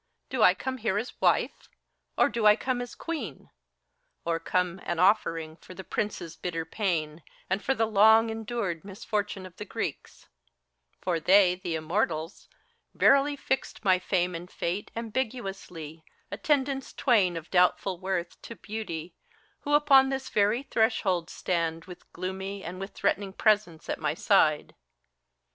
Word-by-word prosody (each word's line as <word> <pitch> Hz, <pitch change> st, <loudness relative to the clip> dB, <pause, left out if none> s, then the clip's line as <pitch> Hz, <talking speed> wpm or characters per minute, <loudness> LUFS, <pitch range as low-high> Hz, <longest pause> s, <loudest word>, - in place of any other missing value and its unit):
Do -, -, -1 dB
I -, -, +7 dB
come 260 Hz, -1 st, -4 dB
here 215 Hz, -3 st, 0 dB
as 225 Hz, +4 st, -5 dB
wife? -, -, +1 dB, 0.5 s
Or -, -, +5 dB
do 230 Hz, -2 st, +1 dB
I 210 Hz, -, +8 dB
come 250 Hz, +1 st, -2 dB
as 245 Hz, -, -7 dB
queen 335 Hz, -2 st, -4 dB
T -, -, -23 dB, 0.8 s
Or 165 Hz, -1 st, 0 dB
come, 180 Hz, +2 st, -1 dB
an 175 Hz, -, -2 dB
offering 165 Hz, -4 st, +2 dB
for 185 Hz, -, -13 dB
the 190 Hz, -, -8 dB
Prince's 175 Hz, -5 st, -3 dB
bitter 165 Hz, -2 st, -4 dB
pain, 160 Hz, -4 st, -2 dB, 0.3 s
And 195 Hz, +2 st, 0 dB
for 270 Hz, -, +1 dB
the 225 Hz, -, +2 dB
long 220 Hz, +1 st, +5 dB
endured 220 Hz, -6 st, -3 dB
misfortune 205 Hz, -1 st, -3 dB
of 185 Hz, -, -13 dB
the -, -, -5 dB
Greeks 210 Hz, -, -5 dB
T -, -, -24 dB, 0.8 s
For 175 Hz, -3 st, 0 dB
they, 185 Hz, +2 st, +5 dB
the 180 Hz, -2 st, -4 dB
Immortals, 165 Hz, 0 st, -2 dB, 0.5 s
verily 280 Hz, +1 st, +4 dB
fixed 265 Hz, -5 st, -3 dB
my 185 Hz, -1 st, +5 dB
Fame 180 Hz, -1 st, 0 dB
and 170 Hz, +2 st, -7 dB
Fate 185 Hz, +5 st, -3 dB
Ambiguously, 200 Hz, -, -5 dB, 0.3 s
attendants 270 Hz, +3 st, 0 dB
twain 200 Hz, -, +2 dB
of 165 Hz, 0 st, -9 dB
doubtful 180 Hz, 0 st, +2 dB
worth 185 Hz, -2 st, -3 dB
To 230 Hz, -, -9 dB
Beauty, 185 Hz, -7 st, -6 dB, 0.5 s
who 290 Hz, 0 st, +1 dB
upon 275 Hz, -3 st, +6 dB
this 270 Hz, 0 st, -3 dB
very 210 Hz, +5 st, +2 dB
threshold 210 Hz, -9 st, +1 dB
stand 165 Hz, -2 st, -2 dB
With 180 Hz, -1 st, -13 dB
gloomy 190 Hz, +2 st, -5 dB
and 180 Hz, +2 st, -6 dB
with 195 Hz, +1 st, -7 dB
threatening 195 Hz, -1 st, 0 dB
presence 205 Hz, -7 st, +1 dB
at -, -, -3 dB
my -, -, -1 dB
side. -, -, +2 dB
195 Hz, 155 wpm, -28 LUFS, 175-225 Hz, 0.8 s, I